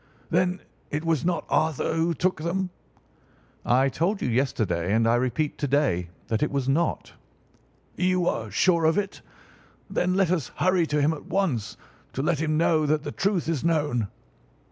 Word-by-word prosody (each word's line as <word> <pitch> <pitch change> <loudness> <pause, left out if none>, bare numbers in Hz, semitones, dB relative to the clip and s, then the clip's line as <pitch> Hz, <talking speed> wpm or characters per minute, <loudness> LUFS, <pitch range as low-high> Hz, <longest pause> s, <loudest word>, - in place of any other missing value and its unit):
"Then 180 0 +1 0.3
it 150 +3 -3
was 165 -3 +1
not 170 -2 0
Arthur 160 -1 +1
who 165 +1 +1
took 185 +5 0
them?" 180 +3 -1 0.9
"I 130 +3 +3
told 175 +9 0
you - - -2
yesterday, 110 -8 0
and 115 0 +3
I 115 - +4
repeat 130 +5 0
to 145 - 0
day, 130 - +1 0.2
that 110 - -1
it 150 - +2
was 140 -2 -2
not." 160 +5 0 0.8
"You 185 0 +2
are 110 -1 -1
sure 170 - +2
of 160 +4 +3
it! 200 -1 -2 0.7
Then 180 +1 +1
let 190 -3 +2
us 165 -8 0
hurry 185 -2 +2
to 150 0 0
him 150 +3 +3
at 155 - -9
once 155 - -1 0.4
to 135 - -2
let 155 -1 +1
him 155 -1 0
know 155 -2 +3
that 150 0 +1
the - - -4
truth 195 -4 0
is 160 -5 -1
known." 150 -9 +1
155 Hz, 175 wpm, -26 LUFS, 135-175 Hz, 0.9 s, I